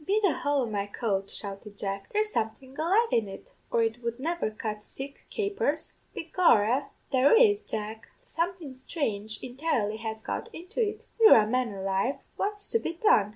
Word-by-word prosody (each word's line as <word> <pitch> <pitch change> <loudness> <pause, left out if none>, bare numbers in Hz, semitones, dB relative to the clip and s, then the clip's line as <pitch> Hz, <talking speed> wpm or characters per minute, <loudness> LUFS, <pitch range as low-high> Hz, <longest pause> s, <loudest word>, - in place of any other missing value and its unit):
"'Be 400 +6 +2
the 380 -6 +4
hole 285 0 +1
o' - - 0
my 205 -3 -2
coat,' 200 -2 -1
shouted 200 0 -7
Jack, 195 -1 -4
'there's 425 0 +1
something 255 +5 -3
alive 390 +10 +3
in 225 -3 +3
it, 195 - -11 0.2
or 230 - +3
it 225 +2 -1
would 235 +1 -3
never 335 -2 -1
cut 215 -1 -5
sich 275 +5 -7 0.2
capers!' 400 -8 -1 0.2
"'Be 325 - -6
gorra, 260 - +4 0.2
there 265 - +6
is, 425 -4 +5
Jack; 220 - -5 0.2
something 340 - -3
sthrange 220 - -3
entirely 245 -5 -1
has 220 0 -4
got - - -4
into 360 +8 -4
it. 425 -2 -1
Wirra, 230 - +8
man 250 0 +1
alive, 195 +6 0 0.2
what's 415 0 -2
to 460 - +3
be 330 - -3
done?' 320 - +4
255 Hz, 175 wpm, -28 LUFS, 215-345 Hz, 0.2 s, Wirra